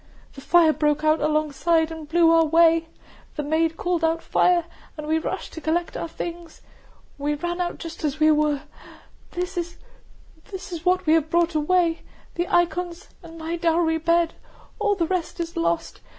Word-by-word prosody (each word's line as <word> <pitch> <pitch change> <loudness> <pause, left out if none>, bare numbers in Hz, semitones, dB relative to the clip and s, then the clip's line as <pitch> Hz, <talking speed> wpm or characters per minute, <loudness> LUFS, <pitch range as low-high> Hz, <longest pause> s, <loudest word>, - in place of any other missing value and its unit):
"The 275 - -11
fire 330 +1 +4
broke 300 0 0
out 310 0 +3
alongside, 310 +2 +1
and 320 -2 -8
blew 330 0 +4
our 330 0 +5
way, 330 +1 +4 0.5
the 300 - -3
maid 320 +2 0
called 350 -2 -1
out 325 +1 +1
'Fire!' 350 -2 +2 0.3
and 305 - -6
we 315 +1 +1
rushed - - -5
to 320 - -8
collect 340 +2 -1
our - - -3
things. 340 0 -8 0.6
We 295 +1 -1
ran 345 +4 -3
out 350 -1 -3
just 330 -1 -8
as 300 0 -2
we 310 0 +5
were.... 300 -2 +1 0.7
This 360 0 -4 0.2
is 370 -8 -12
what 365 +1 +2
we 310 - +4
have 320 -1 +2
brought 340 +1 +2
away.... 330 +2 +1 0.3
The 345 +1 -2
icons, 350 +2 0
and 330 0 -12
my 330 +1 -4
dowry 330 -1 +1
bed, 335 +1 +2 0.5
all 420 -1 +2
the 345 -4 0
rest 355 -1 -3
is 335 -1 -4
lost. 170 0 -2
330 Hz, 170 wpm, -23 LUFS, 310-345 Hz, 0.7 s, our